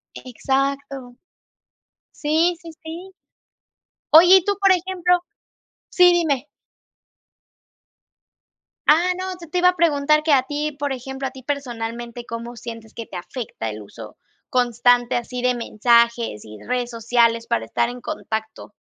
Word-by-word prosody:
Exacto. 270 0 -3 1.0
Sí, 320 +4 +1
sí, 335 - -10
sí. 340 +4 -8 1.0
Oye, 355 +4 +9
y 360 - 0
tú, 405 - +1
por 390 - +5
ejemplo 360 -1 +1 0.7
Sí, 360 -1 +6
dime. 300 -6 0 2.4
Ah, 340 +4 +4
no, 375 0 -4
yo 340 - -11
te 360 - -1
iba 360 0 +6
a 360 - -1
preguntar 305 -2 +2
que 315 - +1
a 260 -2 +4
ti, 295 +2 -3
por 285 -1 -2
ejemplo, 265 +1 -5
a - - -7
ti 260 -1 -13
personalmente, 240 -3 -5
¿cómo 235 +1 -7
sientes 230 -1 -9
que 230 - -7
te 180 - -8
afecta 180 - -6
el 105 0 -7
uso 105 +1 -12 0.3
constante, 245 0 +2
así 245 +1 -3
de 250 - +3
mensajes 235 - +1
y 105 0 -11
redes 245 -1 -1
sociales 230 0 +1
para 115 - -1
estar 115 - 0
en 245 0 -8
contacto? 220 -7 -5
255 Hz, 140 wpm, -21 LUFS, 235-315 Hz, 2.4 s, Oye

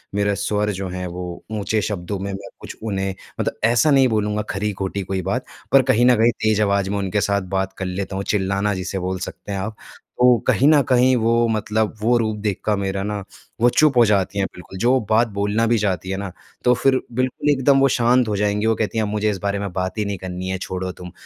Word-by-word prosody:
मेरा 100 0 +1
स्वर 105 +1 -1
जो 95 -1 -4
है 90 0 -5
वो 90 0 -7
ऊँचे 110 0 -1
शब्दों 100 -1 -3
में 100 +1 -4
मैं 95 0 -7
कुछ - - -9
उन्हें 95 -3 -2 0.3
मतलब - - -2
ऐसा 120 +7 +4
नहीं 135 -2 +5
बोलूँगा 105 -2 0
ख़री-ख़ोटी 100 -1 -2
कोई 95 0 -3
बात, - - -2 0.3
पर 135 - +7
कहीं 125 -2 +3
न 125 0 +6
कहीं 115 +2 +4
तेज़ 110 -1 +2
आवाज़ 100 -2 +1
में 100 - -1
उनके 100 +1 -1
साथ 100 0 +1 0.2
बात 95 0 -2
कर 95 - -3
लेता 95 +1 -4
हूँ 100 - -2
चिल्लाना 100 +1 0
जिसे 95 0 -3
बोल 95 +1 -3
सकते 100 - -7
हैं 100 - -2
आप। 105 +3 -4 0.5
तो 125 -1 +6
कहीं 135 - +4
न 150 -1 +6
कहीं 130 0 +4
वो 115 0 +2
मतलब 110 -1 0
वो 120 +3 +3
रूप 110 -2 -1
देख 105 -2 -2
कर 105 - +2
मेरा 95 0 -2
ना 105 -1 -3 0.4
वो 120 - +6
चुप 145 +1 +3
हो 120 - +8
जाती 100 -1 +1
हैं 95 - +2
बिल्कुल 90 +1 -11
जो 125 +4 +3
बात 115 +2 +4
बोलना 105 +3 0
भी 115 +1 +3
चाहती 95 -3 -1
है 95 - -2
ना, 100 -1 -5 0.3
तो 125 - +5
फ़िर 130 +1 +2
बिल्कुल 130 +4 -1
एकदम 135 -1 +4
वो 135 - +5
शांत 125 0 +3
हो 105 - -1
जाएँगी। 105 +1 0
वो 115 0 +3
कहती 110 +1 -2
हैं, 110 - +2
"मुझे 105 +1 0
इस 105 - -1
बारे 100 0 0
में 100 -1 -4
बात 95 +1 -3
ही 105 - 0
नहीं 100 -1 -3
करनी 90 0 -5
है 95 - -1
छोड़ो 95 0 -4
तुम।" 90 0 -10
105 Hz, 235 wpm, -21 LUFS, 95-115 Hz, 0.5 s, हो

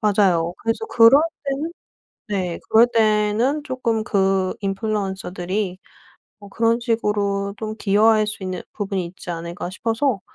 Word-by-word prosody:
맞아요. 190 -6 +2
그래서 225 - -2
그럴 250 - +6 0.2
때는 285 +4 -2 0.6
네 185 -4 -2
그럴 230 +2 +6
때는 220 +6 +2
쪼끔 245 -5 -1
그 195 -3 +1
인플루언서들이 195 -2 -3 0.6
뭐 205 -1 -13
그런 230 +2 +1
식으로 205 -4 -1
좀 215 -1 -5
기여할 215 +1 +3
수 210 -2 -4
있는 185 -1 -4
부분이 195 -3 -2
있지 175 +1 -10
않을까 170 +1 -5
싶어서 225 +2 -1
210 Hz, 285 characters per minute, -21 LUFS, 190-230 Hz, 0.6 s, 그럴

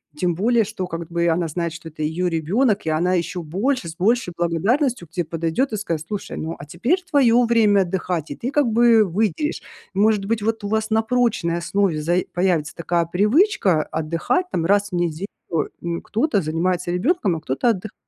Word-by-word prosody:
Тем 175 +2 0
более 230 +5 +2
что, 205 -3 -5
как 165 -2 -6
бы 170 0 +1
она 165 +1 +1
знает, 170 +1 -3
что 165 -1 -9
это 155 0 -6
её 165 +4 -1
ребенок, 195 - +1
и - - 0
она 175 +4 +1
еще 175 +1 -2
больше, 195 - -1
с 160 - -8
большей 215 +2 +1
благодарностью 195 - 0
к - - -50
те 175 0 -1
подойдет 165 - -1
и - - -1
скажет: 165 -6 -3
"Слушай, 205 0 -5
ну, 160 +1 -4
а 140 - -8
теперь 235 - 0
твоё 245 -6 +4
время 220 -4 +4
отдыхать". 175 -3 -2
И 145 - -5
ты 250 - -4
как 290 -2 +2
бы 230 0 +5
выделишь. 210 - -1 0.3
Может 205 0 +2
быть, 220 0 -1
вот 225 0 -1
у - - -2
вас 220 +1 -1
на 220 0 +3
прочной 225 -8 0
основе 175 -1 0
зай 175 +3 +1
появится 175 -4 0
такая 170 0 0
привычка 205 - +3
отдыхать 165 - -1
там 165 - -1
раз 205 +1 +2
в - - -3
неделю. 175 +1 -1 0.6
М, 170 -1 -3
кто-то 225 -2 0
занимается 175 +3 -1
ребенком, 200 - +1
а - - -9
кто-то 155 - 0
отдых 215 -1 -5
185 Hz, 195 wpm, -21 LUFS, 170-225 Hz, 0.6 s, бы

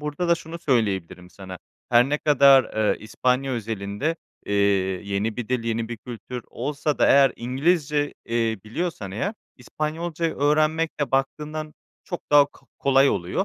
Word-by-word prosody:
Burada 150 +4 -3
da 170 - +5
şunu 165 +1 -8
söyleyebilirim 95 - -1
sana; 95 -2 -10 0.3
her 120 +2 +5
ne 150 +1 0
kadar, 140 -2 +6
eee, 110 -1 0
İspanya 130 +5 0
özelinde, 110 - -3 0.3
eee, 100 - -1 0.5
yeni 100 +2 -2
bir 125 -2 -5
dil, 125 -2 -1
yeni 115 0 -2
bir 120 - -5
kültür 120 +1 -8
olsa 145 +3 -2
da - - +4
eğer 135 -2 +6
İngilizce, 145 +3 0
eee, 115 -2 0
biliyorsan 110 - -4
eğer, 195 - -3 0.2
İspanyolca' 160 +5 -3
yı 165 - -3
öğrenmekle 155 +1 +1
baktığından 150 +3 -2 0.3
çok 175 - -7
daha 145 -1 +7
ko 145 - -23
kolay 135 0 +4
oluyor. 95 - -1
135 Hz, 150 wpm, -24 LUFS, 115-150 Hz, 0.5 s, daha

